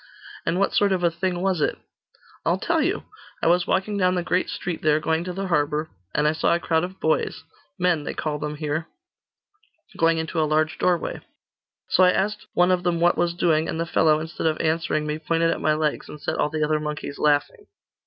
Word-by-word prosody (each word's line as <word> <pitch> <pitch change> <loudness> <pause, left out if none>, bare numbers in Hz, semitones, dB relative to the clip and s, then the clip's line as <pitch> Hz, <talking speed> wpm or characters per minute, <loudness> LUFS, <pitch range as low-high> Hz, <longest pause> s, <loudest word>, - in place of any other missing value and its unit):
'And 165 - +1
what 195 - +1
sort 205 -1 +3
of 180 -2 -1
a 170 - +3
thing 175 +1 -2
was 190 -4 +1
it?' - - 0 0.7
'I'll 170 +2 +2
tell 325 - +1
you. 360 +7 0 0.4
I - - +2
was 175 +1 +3
walking 200 +2 0
down 185 -1 +3
the 180 - -1
great 180 +2 0
street 175 -2 -4
there, 155 0 +3
going 160 +1 0
to 180 - -3
the 195 +2 -4
harbour; 150 -2 0 0.2
and 150 0 +3
I - - +4
saw 160 +2 +2
a - - -1
crowd 160 -1 +1
of 185 +1 -6
boys 160 0 0 0.3
men 175 -4 +1
they - - -5
call 150 -1 -2
them 150 0 -4
here 155 +2 -3 1.1
going 165 0 +3
into 160 0 -1
a 155 - +1
large 155 0 +1
doorway. 180 -2 0 0.7
So - - +3
I 180 - +7
asked 210 +2 -1
one 175 +1 +4
of 180 -1 +2
them 175 -1 0
what 175 +1 +4
was 170 0 0
doing, 160 -2 +2
and 160 - -3
the 165 - 0
fellow, 155 -2 +3
instead 160 +1 -3
of 155 - 0
answering 160 -1 0
me, 150 +1 -3
pointed 165 +1 +1
at - - -3
my 155 0 +2
legs, 155 -1 -1
and 150 - -9
set - - -2
all - - +2
the 155 0 -1
other 155 0 +1
monkeys 150 -1 -5
laughing. 145 -1 +1
165 Hz, 225 wpm, -24 LUFS, 155-180 Hz, 1.1 s, I